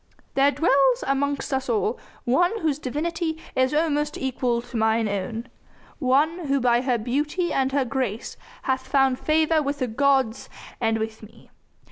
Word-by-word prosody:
"There 275 +1 +4
dwells 275 -3 +3
amongst 280 +1 -1
us 265 -1 -1
all 225 0 0 0.2
one 355 - +2
whose 300 -3 0
divinity 320 +4 -2 0.2
is 260 0 +2
almost 300 -1 0
equal 250 -2 -1
to 245 - -12
mine 220 0 +2
own 210 +4 -3 0.5
one 300 +5 +1
who 275 0 +2
by 240 -1 +3
her 250 -2 +1
beauty 295 +10 -1
and 265 0 +1
her 275 -1 +1
grace 245 -4 -3 0.3
hath 260 0 -1
found 265 -1 +2
favour 315 0 +2
with 285 0 -2
the 260 - 0
gods 265 -1 +1 0.3
and 225 -1 +1
with 220 0 -4
me. 215 - -16
265 Hz, 155 wpm, -24 LUFS, 240-295 Hz, 0.5 s, There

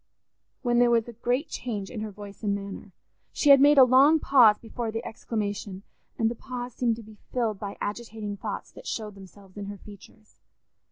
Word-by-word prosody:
when 240 -1 +2
there 245 0 +5
was 230 -1 +2
a 240 - -8
great 245 +6 -1
change 210 -6 -5
in 225 - -5
her 215 - -4
voice 205 -1 -11
and 205 -2 0
manner. 200 0 -8 0.4
She 290 - +4
had 275 -1 +8
made 290 +1 +6
a 265 - +10
long 265 +5 +6
pause 240 -8 +6
before 230 0 -5
the 225 +1 -5
exclamation, 205 -3 -4 0.3
and 225 - +2
the 230 - 0
pause 245 0 -7
seemed 235 -2 0
to 230 - -10
be 215 -1 -15
filled 225 -5 -1
by 200 -1 -6
agitating 210 -1 -5
thoughts - - -6
that - - -12
showed 215 -2 -4
themselves 195 0 -15
in 200 - -5
her 205 0 -7
features. 210 +2 -16
220 Hz, 200 wpm, -26 LUFS, 205-245 Hz, 0.4 s, a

